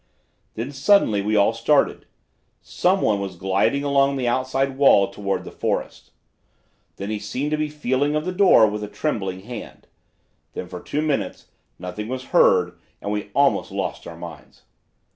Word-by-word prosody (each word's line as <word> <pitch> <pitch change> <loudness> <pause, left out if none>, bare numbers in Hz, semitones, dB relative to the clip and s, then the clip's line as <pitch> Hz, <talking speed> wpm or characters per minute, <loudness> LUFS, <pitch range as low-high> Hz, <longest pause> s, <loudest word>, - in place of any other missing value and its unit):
Then 115 +5 -4
suddenly 135 - +3
we 105 +2 0
all 100 +2 +4
started. 130 +6 +1 0.6
Some 190 +2 +1
one 105 -2 +2
was 95 -2 -5
gliding 95 +10 +1
along 140 -1 +2
the 130 -3 -1
outside 130 +2 0
wall 130 -8 +5
toward 100 0 -3
the - - -9
forest; - - -3 0.9
then 100 +2 -5
he 105 - -2
seemed 125 +8 -3
to 155 - +1
be 155 0 -1
feeling 145 0 0
of 150 +1 -1
the 185 - -1
door 185 - +6
with 105 0 -2
a - - -4
trembling 100 -5 -3
hand; 115 +2 -9 0.7
then - - -5
for 90 0 -8
two 150 - -2
minutes 150 -3 -2 0.3
nothing 90 +4 -6
was 130 +1 -4
heard 90 - +4 0.2
and 100 - -4
we 105 0 -3
almost 140 0 +2
lost - - -4
our - - -9
minds. - - -11
120 Hz, 165 wpm, -22 LUFS, 100-145 Hz, 0.9 s, door